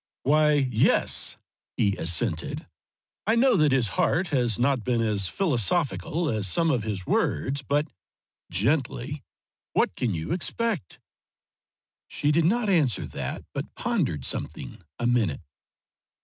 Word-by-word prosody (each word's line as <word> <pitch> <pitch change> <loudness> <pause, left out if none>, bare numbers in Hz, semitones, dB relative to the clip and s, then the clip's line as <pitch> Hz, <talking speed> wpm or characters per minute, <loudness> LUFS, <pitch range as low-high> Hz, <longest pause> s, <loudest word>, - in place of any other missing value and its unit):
"Why, 150 +2 +4
yes," 130 -6 +2 0.4
he 100 -1 +2
assented, 85 0 -1 0.6
"I 220 - +4
know 250 +1 +4
that 155 -3 +4
his 130 -5 +2
heart 175 - +1
has 125 -7 +1
not 125 -1 +1
been 120 0 0
as 105 -4 +1
philosophical 150 - 0
as 110 -6 0
some 165 - +2
of 125 -4 +1
his 105 -4 -4
words; 135 - 0
but" 145 +3 0 0.6
gently 130 - -1 0.5
"what - - +1
can 115 -7 -1
you 80 0 -4
expect?" 185 - -2 1.1
She 145 - 0
did 160 +1 +3
not 225 +5 +2
answer 155 - +2
that, - - -5
but - - -5
pondered 70 -4 -1
something - - -5 0.2
a 120 - -3
minute. 115 - +1
130 Hz, 130 wpm, -26 LUFS, 105-155 Hz, 1.1 s, Why